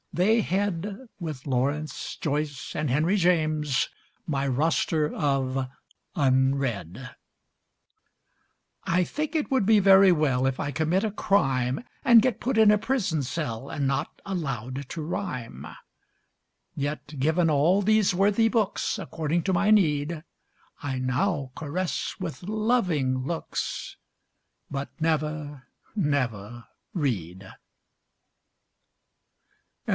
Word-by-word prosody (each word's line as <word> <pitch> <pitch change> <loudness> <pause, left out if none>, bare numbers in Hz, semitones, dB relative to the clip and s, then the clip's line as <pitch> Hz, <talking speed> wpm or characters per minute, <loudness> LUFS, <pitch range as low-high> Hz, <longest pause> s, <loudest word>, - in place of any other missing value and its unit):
they 215 +6 +3
head, 200 +4 -2
With 155 -7 -6
Lawrence, 140 +3 -2
Joyce 145 -2 -3
and 150 -2 -1
Henry 155 +9 +2
James, 155 -7 +2 0.4
My 140 -3 -1
Roster 155 +2 +1
of 135 -3 0 0.5
Unread. 130 - 0 1.7
I 180 +2 +2
think 305 - -4
it 305 -3 -1
would 260 -7 +2
be 215 0 +5
very 195 -1 +7
well 135 -6 +2
If 135 -1 -2
I 145 - -2
commit 160 +6 +1
a 220 - 0
crime, 135 - +1 0.2
And 235 -5 +7
get 255 -1 0
put 250 -1 -1
in 220 -1 +7
a 210 - +5
prison 215 - 0
cell 135 -3 -4
And 140 -3 -1
not 135 0 -2
allowed 135 - -4
to 165 - -5
rhyme; 155 - -5 1.1
Yet 145 +1 -4
given 160 +4 +2
all 160 +7 +3
these 215 -1 +3
worthy 205 +4 +3
books 220 -2 0
According 165 -2 -2
to 190 - 0
my 200 +3 +2
need, 155 -5 +2 0.6
I 135 -3 -3
now 135 +2 -1
caress 160 0 -3
with 180 -2 -5
loving 190 - +1
looks, 160 +6 -4 0.7
But 140 0 -4
never, 150 -4 -2 0.3
never 120 - -1 0.3
read. 95 - -3
155 Hz, 110 wpm, -26 LUFS, 135-195 Hz, 1.7 s, very